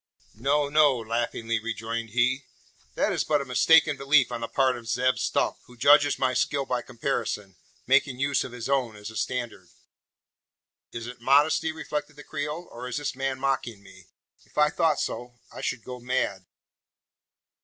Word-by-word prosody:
"No, 140 +6 +1
no!" 145 -2 +4
laughingly 115 0 -2
rejoined 115 +1 -4
he. 125 +4 +1 0.5
"That - - +1
is - - 0
but 150 -1 +2
a 140 - -4
mistaken 150 +3 +4
belief 135 -1 +3
on 115 - -4
the 115 - -2
part 130 0 +2
of 120 -1 -10
Zeb 125 +3 +1
Stump, - - 0
who 125 - -16
judges 145 +3 +5
my 130 -1 +1
skill 140 +2 0
by 125 -2 -1
comparison, 115 -6 -3 0.3
making 130 -2 +3
use 140 0 +1
of - - -7
his 120 -2 -6
own 130 -5 0
as 105 +1 -8
a - - -13
standard." 125 -1 -3 1.2
"Is 115 0 -6
it 120 0 -9
modesty?" 145 +5 +3
reflected 150 -1 -5
the 145 - -11
Creole. 155 +4 -5
"Or 125 +2 -7
is 125 - -3
this 145 -3 -3
man 135 0 -2
mocking 130 -6 -2
me? 95 -2 -16 0.4
If - - -26
I 150 0 +4
thought 160 -3 +2
so, 120 0 -4 0.2
I - - -8
should 120 -3 -3
go 125 -1 -8
mad!" 120 -7 -2
130 Hz, 175 wpm, -26 LUFS, 115-140 Hz, 1.2 s, judges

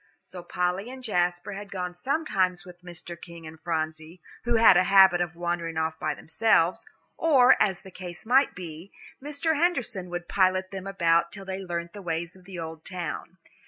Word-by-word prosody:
So 180 - -10
Polly 180 +4 -2
and 260 0 -9
Jasper 180 -3 0
had 200 0 -7
gone 180 -2 -4
sometimes 185 - -1
with 180 -1 -13
Mr. 175 -1 -9
King 170 -1 -12
and 160 0 -11
Phronsie, 160 +1 -3 0.3
who 240 0 +2
had 225 0 +7
a 185 - +4
habit 190 -2 +6
of 175 -1 -2
wandering 170 -1 -3
off 160 0 -1
by - - -1
themselves; 220 +2 +1 0.3
or, 270 -6 +6
as 195 -4 +1
the 190 - -12
case 180 0 -9
might 265 +4 +3
be, 170 0 -9 0.3
Mr. 300 +2 -1
Henderson 245 - 0
would 175 0 -5
pilot 185 -1 +2
them 195 0 -6
about 170 -3 +2
till 195 -1 -8
they 190 0 -4
learnt 170 -2 -5
the 205 - -9
ways 170 0 -3
of 185 -1 -18
the 190 -1 -9
old 160 -1 -7
town. 180 0 -6
180 Hz, 185 wpm, -27 LUFS, 170-195 Hz, 0.3 s, had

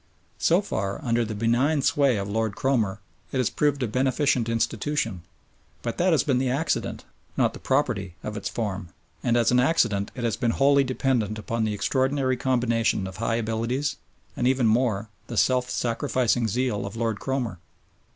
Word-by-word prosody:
So - - +4
far, 100 0 -2
under 120 0 +2
the 110 -1 -4
benign 125 +7 +2
sway 140 -5 +3
of 100 0 -3
Lord 110 0 -1
Cromer, 110 -7 0 0.3
it - - -2
has 130 -3 +1
proved 145 -2 +1
a - - 0
beneficent 130 0 +1
institution, 115 - -1 0.6
but 115 - -3
that 180 +1 +3
has 155 -6 +3
been 130 -4 +1
the 130 0 0
accident, 145 +6 -1 0.3
not - - +2
the - - -9
property 110 - 0
of 105 - -4
its 105 - -3
form, 105 -5 -3 0.4
and 120 -1 +2
as 120 0 +3
an 125 - +4
accident 115 -8 +2
it 125 - -5
has 115 -4 0
been 120 -3 +1
wholly 140 0 +5
dependent 125 -5 0
upon 110 +1 -2
the 110 - -1
extraordinary 130 +3 +1
combination 120 -5 +1
of 95 0 -7
high 115 +1 0
abilities, 115 +5 -1 0.4
and, 125 - +1
even 130 -1 +2
more, 110 -2 +1 0.2
the 120 - -5
self 125 +1 +2
sacrificing 120 0 0
zeal 120 -1 -1
of 100 - -8
Lord 115 -2 -1
Cromer. 125 -9 -2
120 Hz, 175 wpm, -25 LUFS, 110-130 Hz, 0.6 s, wholly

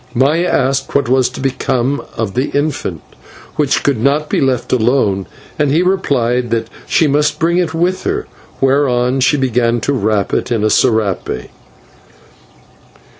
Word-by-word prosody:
Maya 150 +8 +2
asked 135 -2 0
what 140 -4 +2
was 130 0 +2
to - - -10
become 130 0 -1 0.2
of 110 -4 -2
the 130 +3 -1
infant, 145 - -2 0.5
which 145 -2 +1
could 140 -5 +1
not 145 +4 +1
be - - +1
left 130 -3 0
alone, 110 -5 +1 0.3
and 150 -2 +2
he 160 +6 +2
replied 125 -10 0
that 115 -1 -1 0.2
she 160 - +3
must 150 +1 +1
bring 170 +2 +1
it 165 -3 -1
with 180 +3 0
her, 410 +2 -2 0.3
whereon 135 -2 +2
she 140 +3 +3
began 120 -3 +1
to 140 - 0
wrap 105 -5 0
it - - -1
in 115 -3 0
a 110 - +3
/serape 100 - 0
130 Hz, 155 wpm, -15 LUFS, 120-145 Hz, 0.5 s, she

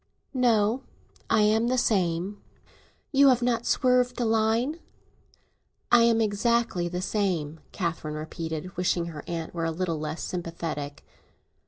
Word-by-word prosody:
"No; 235 -2 +2 0.5
I 225 -1 +4
am 220 +2 +3
the 255 +1 +1
same." 190 -3 0 0.7
"You 280 -1 +6
have 250 -2 +4
not 240 -1 0
swerved 250 -1 +2
a 240 - +1
line?" 225 +7 +1 1.1
"I 240 - +7
am 230 -1 +3
exactly 215 -3 +1
the 180 +1 -4
same," 175 -8 -1
Catherine 165 -4 -3
repeated, 160 +2 -5
wishing 175 -1 +1
her 150 -3 -8
aunt 165 -2 -4
were 165 -1 -2
a - - 0
little 165 -1 -2
less 155 +1 -4
sympathetic. 165 -5 -5
200 Hz, 135 wpm, -27 LUFS, 165-235 Hz, 1.1 s, I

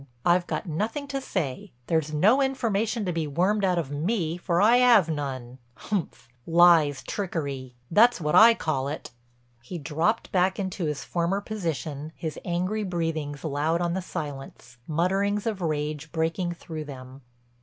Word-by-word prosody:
I've 175 0 +3
got - - -3
nothing 215 - -3
to 275 -1 -2
say; 150 - -4
there's 160 0 0
no 210 - +4
information 230 -4 0
to 180 - -1
be 160 -2 -1
wormed 185 +8 +1
out 185 -2 +2
of 155 -5 -2
me 165 +2 -1
for 175 -1 -1
I 235 +5 +5
'ave 215 -10 +5
none. 130 -4 -5 0.3
Umph—lies, 160 - +2
trickery—that's 145 - 0
what 150 -2 -1
I 230 +1 +8
call 135 -8 -1
it!" 145 -2 -6 0.5
He 125 +9 -7
dropped 165 +9 -1
back 185 0 +2
into 190 -3 -3
his 150 -2 -3
former 175 +3 -1
position, 160 -7 -4
his 160 -2 -5
angry 185 +5 -1
breathings 165 -5 -3
loud 155 +2 0
on 175 -1 0
the 190 - -2
silence, 135 -6 -7
mutterings 195 +6 0
of 215 -4 -2
rage 155 -1 -2
breaking 165 +2 -1
through 160 -2 -7
them. 130 -1 -10
170 Hz, 150 wpm, -26 LUFS, 150-195 Hz, 0.5 s, I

